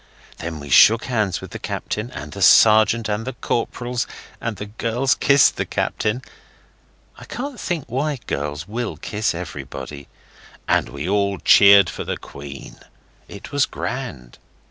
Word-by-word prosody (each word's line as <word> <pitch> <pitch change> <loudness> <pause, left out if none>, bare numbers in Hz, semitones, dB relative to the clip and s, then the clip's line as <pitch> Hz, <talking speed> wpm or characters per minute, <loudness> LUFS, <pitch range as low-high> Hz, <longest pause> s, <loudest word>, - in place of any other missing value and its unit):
Then 80 -2 -5
we 70 -1 -9
shook 115 - +7
hands 110 -7 -1
with - - -10
the - - -7
captain, 105 +3 -4
and 75 -11 -8
the - - -8
sergeant 110 +1 +6
and 105 +1 -2
the 130 +3 -5
corporals, 120 +1 -2 0.3
and 115 -2 -3
the 105 - -6
girls 115 +5 0
kissed 140 0 +4
the - - 0
captain 110 +5 -2 1.0
I - - -11
can't 260 -2 -6
think 170 -7 -3
why 140 +5 -2
girls 75 +3 -4
will 115 +2 -4
kiss 105 -3 -2
everybody 70 -4 -7 0.6
and - - +2
we 70 +4 -6
all 100 0 +1
cheered 100 +2 +7
for - - -5
the - - -4
Queen. 70 -1 -11 0.5
It 100 - -10
was 145 -1 +2
grand. 95 - -6
105 Hz, 150 wpm, -21 LUFS, 85-125 Hz, 1.0 s, shook